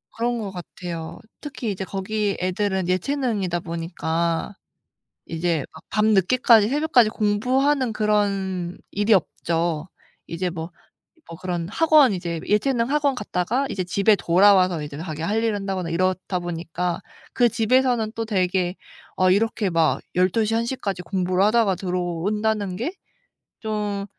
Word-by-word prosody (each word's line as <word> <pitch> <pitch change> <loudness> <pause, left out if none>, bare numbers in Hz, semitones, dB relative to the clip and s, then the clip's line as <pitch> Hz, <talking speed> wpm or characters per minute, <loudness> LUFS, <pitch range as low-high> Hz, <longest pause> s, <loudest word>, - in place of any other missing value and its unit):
그런 240 +1 -1
것 205 -3 -4
같아요. 175 -2 -7 0.2
특히 265 -7 -4
이제 190 0 -4
거기 200 +2 -2
애들은 190 0 -1
예체능이다 195 -2 0
보니까 170 +1 -2 0.7
이제 165 -3 -1
막 - - -13
밤늦게까지 215 +2 +4
새벽까지 270 -5 +3
공부하는 255 +5 +1
그런 195 -4 0
일이 205 +2 +1
없죠. 165 -2 -1 0.4
이제 175 +2 -3
뭐 165 0 -6 0.6
뭐 165 - -7
그런 175 -2 -3
학원 295 - +4
이제 170 -2 -4
예체능 230 +3 +1
학원 290 -2 +2
갔다가 225 +4 -1
이제 185 -2 -2
집에 200 +4 +3
돌아와서 185 -2 +4
이제 145 -1 -7
자기 160 -2 -6
할 215 +6 0
일을 225 - +1
한다거나 190 -4 -3
이렇다 185 +2 0
보니까 175 0 -3 0.3
그 240 -2 +4
집에서는 230 0 +2
또 225 - -2
되게 185 -3 0 0.4
어 185 0 +3
이렇게 210 +1 +1
막 165 -2 +2
12:00 210 +5 +2
1:00까지 225 -5 -2
공부를 185 +1 0
하다가 215 -2 +3
들어온다는 185 +3 -1
게 255 - -3 0.7
좀 210 -2 -2
195 Hz, 290 characters per minute, -23 LUFS, 175-220 Hz, 0.7 s, 밤늦게까지